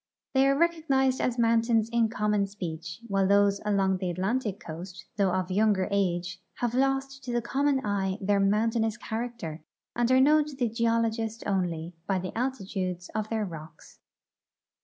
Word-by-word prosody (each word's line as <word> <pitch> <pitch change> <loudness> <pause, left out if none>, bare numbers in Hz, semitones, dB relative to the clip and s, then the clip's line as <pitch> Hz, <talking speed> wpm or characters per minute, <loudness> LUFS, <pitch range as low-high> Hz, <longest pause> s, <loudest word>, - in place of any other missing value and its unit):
They 270 0 +4
are 275 0 +3
recognized 280 -6 +2
as 245 -1 0
mountains 230 -1 +3
in 230 -1 +3
common 210 -2 +1
speech, 170 -3 -6
while 195 -2 +2
those 200 0 +3
along 195 -2 +2
the 185 -1 -2
Atlantic 200 +4 -1
coast, 180 +4 -8
though 200 -3 +2
of 185 0 -1
younger 200 -1 +2
age, 180 -2 -1
have 240 -1 -1
lost 270 +1 0
to 245 - -3
the 240 - +1
common 270 +2 0
eye 195 -2 0
their 200 0 +1
mountainous 220 +2 +1
character 225 -10 -5 0.3
and 240 0 +1
are 260 - +6
known 300 +3 +5
to 295 -2 -8
the 245 -3 0
geologist 230 0 0
only 175 -4 -1
by 195 - +1
the 185 0 -5
altitudes 195 -8 -3
of 215 0 -2
their 220 -2 -1
rocks. 160 -3 -11
210 Hz, 160 wpm, -28 LUFS, 190-240 Hz, 0.3 s, are